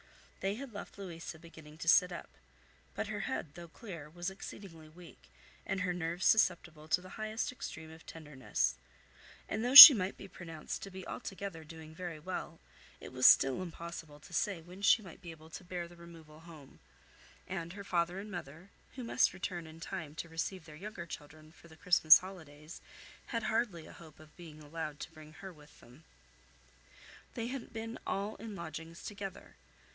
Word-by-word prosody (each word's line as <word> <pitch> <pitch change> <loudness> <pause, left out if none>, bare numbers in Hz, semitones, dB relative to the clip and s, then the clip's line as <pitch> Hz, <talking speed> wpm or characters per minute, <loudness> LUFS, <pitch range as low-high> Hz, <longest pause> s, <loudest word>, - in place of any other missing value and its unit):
They 195 +1 -2
had 260 0 -9
left 205 - -9
Louisa 170 -4 -8
beginning 160 -2 -14
to 165 - -8
sit 180 +1 +5
up; 170 - -7 0.7
but - - -2
her - - -5
head, 145 - -4
though 170 +1 -10
clear, 165 -5 -10
was 175 +3 -5
exceedingly 170 -5 -11
weak, 165 - -16 0.4
and 195 -1 -2
her 180 -1 -1
nerves 175 +1 -3
susceptible 175 -7 +2
to 160 +3 +1
the 185 - -12
highest 215 +3 -3
extreme 160 -10 -8
of 160 0 -14
tenderness; 150 - -2 0.7
and 215 +2 -3
though 250 +2 -1
she 285 +1 +17
might 190 -4 -3
be 195 - -10
pronounced 165 -4 -8
to 195 - -7
be 190 -1 -9
altogether 195 -7 -7
doing 160 0 -12
very 175 -1 -7
well, 165 0 -6 0.4
it - - -11
was 130 0 +5
still 135 +6 +5
impossible 170 -3 -8
to 175 - -15
say 180 +2 -1
when 180 +4 -13
she 215 +2 +4
might 175 -4 -13
be 175 - -10
able 160 0 -13
to 185 - -9
bear 175 -1 -5
the 175 - -16
removal 165 -3 -14
home; 160 -4 -15 0.7
and 170 -2 -5
her 200 +1 -8
father 175 -1 -1
and 205 +2 -7
mother, 175 +1 -9 0.2
who 255 - -6
must 230 - +2
return 175 -2 -5
in 160 +1 -13
time 165 -4 -7
to 170 - -6
receive 165 +2 -5
their 155 -2 -12
younger 190 +1 -8
children 155 0 -11
for 170 - -18
the 160 -1 -17
Christmas 165 -3 +7
holidays, 160 -5 -11 0.5
had 230 -3 -3
hardly 220 -7 -1
a - - -13
hope 155 -3 -15
of 155 -1 -17
being 155 -3 -12
allowed 150 -1 -6
to - - -8
bring 155 -1 -14
her 180 +4 -10
with 150 -1 -19
them. 125 +7 -18 1.3
They 230 - -3
had 265 -2 -7
been 225 +1 -6
all 200 +2 -3
in 215 0 -8
lodgings 165 -1 -8
together. 200 -2 -8
170 Hz, 185 wpm, -33 LUFS, 160-190 Hz, 1.3 s, she